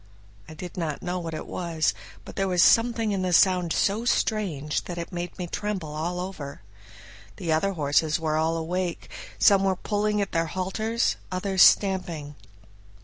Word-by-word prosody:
I 160 Hz, -, -9 dB
did 180 Hz, +3 st, -8 dB
not 160 Hz, -4 st, -3 dB
know 180 Hz, +1 st, -2 dB
what 165 Hz, -2 st, -5 dB
it 155 Hz, -, -6 dB
was, 160 Hz, -8 st, -1 dB, 0.3 s
but -, -, -10 dB
there 195 Hz, -, 0 dB
was 180 Hz, -2 st, +3 dB
something 230 Hz, -2 st, +4 dB
in 195 Hz, -2 st, -1 dB
the 185 Hz, -1 st, -1 dB
sound 180 Hz, -1 st, +4 dB
so 205 Hz, +7 st, +1 dB
strange 185 Hz, -11 st, 0 dB
that 175 Hz, -, -6 dB
it 170 Hz, -, -5 dB
made 175 Hz, 0 st, -5 dB
me 180 Hz, -, -3 dB
tremble 185 Hz, -4 st, -4 dB
all 170 Hz, +4 st, -3 dB
over. 155 Hz, -, -6 dB, 0.7 s
The 165 Hz, -, -3 dB
other 180 Hz, +6 st, +1 dB
horses 155 Hz, 0 st, +1 dB
were 155 Hz, -1 st, -1 dB
all 160 Hz, +1 st, +1 dB
awake; 175 Hz, +2 st, -3 dB, 0.3 s
some 195 Hz, -1 st, +5 dB
were 190 Hz, -1 st, +2 dB
pulling 210 Hz, +2 st, -1 dB
at 200 Hz, -1 st, -1 dB
their 165 Hz, 0 st, 0 dB
halters, 215 Hz, +7 st, -1 dB
others 185 Hz, 0 st, 0 dB
stamping. 175 Hz, -7 st, +3 dB
180 Hz, 170 wpm, -26 LUFS, 160-195 Hz, 0.7 s, some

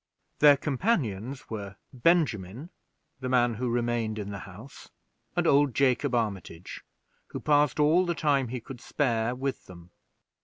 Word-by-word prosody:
Their 145 Hz, -1 st, +7 dB
companions 135 Hz, -, -2 dB
were 100 Hz, -3 st, -6 dB, 0.2 s
Benjamin, 130 Hz, -, 0 dB, 0.5 s
the 130 Hz, -1 st, -4 dB
man 120 Hz, -2 st, +3 dB
who 125 Hz, +3 st, -3 dB
remained 120 Hz, -2 st, -1 dB
in 100 Hz, -1 st, -5 dB
the 100 Hz, -, -6 dB
house, 100 Hz, +8 st, -12 dB, 0.5 s
and 175 Hz, -1 st, +1 dB
old 140 Hz, -4 st, +3 dB
Jacob 130 Hz, -1 st, +2 dB
Armitage, 100 Hz, -7 st, -4 dB, 0.4 s
who -, -, -6 dB
passed 145 Hz, -2 st, +2 dB
all 165 Hz, +5 st, +4 dB
the 175 Hz, -, -1 dB
time 140 Hz, -5 st, +1 dB
he 125 Hz, +2 st, -5 dB
could 120 Hz, +1 st, -11 dB
spare 120 Hz, -4 st, -1 dB
with 135 Hz, +1 st, -4 dB
them. 85 Hz, -1 st, -14 dB
125 Hz, 145 wpm, -27 LUFS, 110-145 Hz, 0.5 s, Their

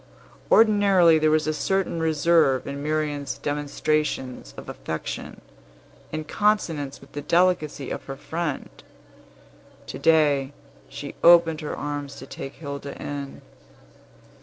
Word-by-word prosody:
Ordinarily 200 Hz, -7 st, +5 dB
there 155 Hz, 0 st, +3 dB
was 155 Hz, 0 st, +2 dB
a 155 Hz, -, 0 dB
certain 190 Hz, +2 st, -1 dB
reserve 160 Hz, -3 st, +3 dB
in 140 Hz, 0 st, -5 dB
Miriam's 145 Hz, -3 st, -2 dB
demonstrations 145 Hz, -2 st, -2 dB
of -, -, -9 dB
affection, 80 Hz, 0 st, -6 dB, 0.7 s
in 155 Hz, 0 st, -3 dB
consonance 160 Hz, -6 st, 0 dB
with 140 Hz, -, -17 dB
the 145 Hz, -, -5 dB
delicacy 170 Hz, -5 st, +1 dB
of -, -, -5 dB
her 135 Hz, -, -6 dB
friend. 160 Hz, 0 st, -4 dB, 1.1 s
To -, -, -7 dB
day, 145 Hz, -4 st, +3 dB, 0.4 s
she 145 Hz, -, -7 dB
opened 170 Hz, -2 st, +6 dB
her 150 Hz, -, -4 dB
arms 145 Hz, -1 st, -4 dB
to 135 Hz, -, -9 dB
take 135 Hz, 0 st, -8 dB
Hilda 140 Hz, -2 st, -7 dB
in. 140 Hz, -1 st, -6 dB
150 Hz, 120 wpm, -24 LUFS, 140-165 Hz, 1.1 s, opened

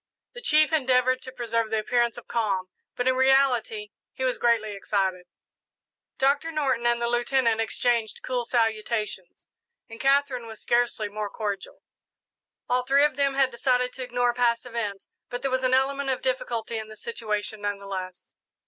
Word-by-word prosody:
The 485 Hz, -, -9 dB
chief 310 Hz, -5 st, +4 dB
endeavoured 255 Hz, -3 st, +3 dB
to 260 Hz, -, -9 dB
preserve 230 Hz, -3 st, -1 dB
the 220 Hz, -, 0 dB
appearance 235 Hz, +2 st, +1 dB
of -, -, -10 dB
calm, 195 Hz, -5 st, -1 dB, 0.3 s
but 245 Hz, -, -1 dB
in 260 Hz, -, +5 dB
reality 255 Hz, -5 st, +2 dB, 0.2 s
he 260 Hz, -, -5 dB
was 255 Hz, -1 st, 0 dB
greatly 230 Hz, -3 st, +2 dB
excited. 195 Hz, -2 st, -1 dB, 0.9 s
Doctor 285 Hz, +4 st, +2 dB
Norton 265 Hz, -6 st, 0 dB
and 240 Hz, 0 st, +2 dB
the 235 Hz, -, 0 dB
Lieutenant 240 Hz, -1 st, +2 dB
exchanged 230 Hz, -1 st, 0 dB
cool 250 Hz, -1 st, -1 dB
salutations, 225 Hz, -, -1 dB, 0.4 s
and 225 Hz, 0 st, -11 dB
Katherine 275 Hz, -3 st, +2 dB
was 220 Hz, -1 st, -10 dB
scarcely 240 Hz, -3 st, +1 dB
more 210 Hz, 0 st, -4 dB
cordial. 205 Hz, -2 st, -5 dB, 0.8 s
All 250 Hz, +1 st, +2 dB
three 275 Hz, +3 st, +4 dB
of 295 Hz, -, 0 dB
them 275 Hz, -1 st, +1 dB
had 270 Hz, -1 st, +3 dB
decided 250 Hz, +1 st, +1 dB
to 260 Hz, -, -5 dB
ignore 245 Hz, -1 st, +1 dB
past 240 Hz, 0 st, +1 dB
events, 225 Hz, -5 st, -4 dB, 0.2 s
but 245 Hz, -, -5 dB
there 270 Hz, -, 0 dB
was 260 Hz, 0 st, +1 dB
an 255 Hz, 0 st, +4 dB
element 275 Hz, +1 st, +1 dB
of 260 Hz, -, -1 dB
difficulty 235 Hz, -3 st, -2 dB
in 220 Hz, -, -7 dB
the 215 Hz, 0 st, -12 dB
situation, 215 Hz, -2 st, -3 dB
none 205 Hz, -1 st, -1 dB
the 200 Hz, -, -12 dB
less. 185 Hz, -2 st, -7 dB
240 Hz, 170 wpm, -26 LUFS, 220-260 Hz, 0.9 s, in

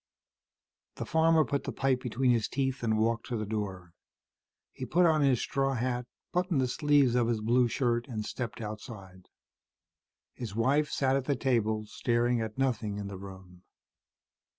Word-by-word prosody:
The -, -, -5 dB
farmer 160 Hz, -1 st, +3 dB
put 140 Hz, -, -2 dB
the -, -, -2 dB
pipe 130 Hz, -2 st, 0 dB
between 125 Hz, +1 st, +1 dB
his 115 Hz, -3 st, +1 dB
teeth 135 Hz, 0 st, -2 dB
and 110 Hz, -2 st, +1 dB
walked 115 Hz, +1 st, 0 dB
to 120 Hz, -, -2 dB
the 110 Hz, -, -3 dB
door. 95 Hz, -5 st, -4 dB, 0.8 s
He -, -, -7 dB
put 170 Hz, +8 st, +3 dB
on 160 Hz, -2 st, +4 dB
his 135 Hz, -4 st, +3 dB
straw 135 Hz, -1 st, 0 dB
hat, 125 Hz, 0 st, -2 dB, 0.3 s
buttoned 180 Hz, -4 st, +1 dB
the 130 Hz, -, +2 dB
sleeves 140 Hz, 0 st, +3 dB
of 120 Hz, -2 st, +2 dB
his 115 Hz, -2 st, 0 dB
blue 120 Hz, +3 st, +3 dB
shirt 120 Hz, 0 st, 0 dB
and 110 Hz, -5 st, -4 dB
stepped 120 Hz, -1 st, -5 dB
outside. 105 Hz, -4 st, -8 dB, 1.1 s
His 115 Hz, -5 st, -7 dB
wife 140 Hz, +6 st, +2 dB
sat 135 Hz, -1 st, +1 dB
at 135 Hz, -1 st, -1 dB
the 140 Hz, -, +1 dB
table, 110 Hz, -5 st, 0 dB
staring 120 Hz, +2 st, 0 dB
at 110 Hz, 0 st, -5 dB
nothing 115 Hz, -6 st, -1 dB
in 100 Hz, -1 st, -5 dB
the 100 Hz, -, -7 dB
room. 95 Hz, -2 st, -11 dB
120 Hz, 170 wpm, -30 LUFS, 110-135 Hz, 1.1 s, on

